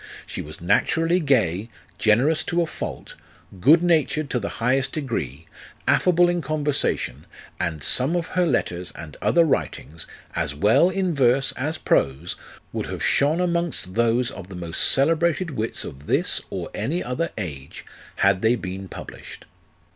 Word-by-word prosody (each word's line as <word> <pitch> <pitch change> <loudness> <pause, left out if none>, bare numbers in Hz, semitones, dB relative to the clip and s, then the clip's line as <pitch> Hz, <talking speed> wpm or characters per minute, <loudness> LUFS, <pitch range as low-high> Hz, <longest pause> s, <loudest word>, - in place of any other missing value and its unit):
She - - -5
was 75 +1 -9
naturally 165 - +2
gay, 110 - +1 0.3
generous 125 +9 +3
to 175 0 +1
a - - -1
fault, - - -6 0.5
good 155 - +6
natured 155 -3 +1
to 125 - +1
the 100 - -3
highest 130 +3 +1
degree, 85 - -4 0.4
affable 175 -1 +4
in 175 0 0
conversation, 145 - -1 0.3
and 80 -5 -2
some 135 +7 +2
of 170 -2 -2
her 180 -1 +1
letters 90 - -1
and 75 -2 -9
other 170 - +4
writings, 80 - -2 0.3
as 80 -4 -1
well 105 - +4
in 185 -2 0
verse 135 -1 +3
as 150 +5 -3
prose, 70 +6 0 0.4
would - - -3
have - - -5
shone 150 +4 +3
amongst 170 - -1
those 120 +2 +2
of 95 -2 -9
the 95 - -9
most 85 -2 +2
celebrated 165 +4 +2
wits 110 -4 -3
of 70 +2 -10
this, - - +1
or - - -5
any 170 +6 -2
other 140 +7 -2
age, 70 -9 -6 0.3
had 95 -1 +3
they 110 +2 +3
been 95 -3 -6
published. - - -10
125 Hz, 155 wpm, -23 LUFS, -, 0.5 s, good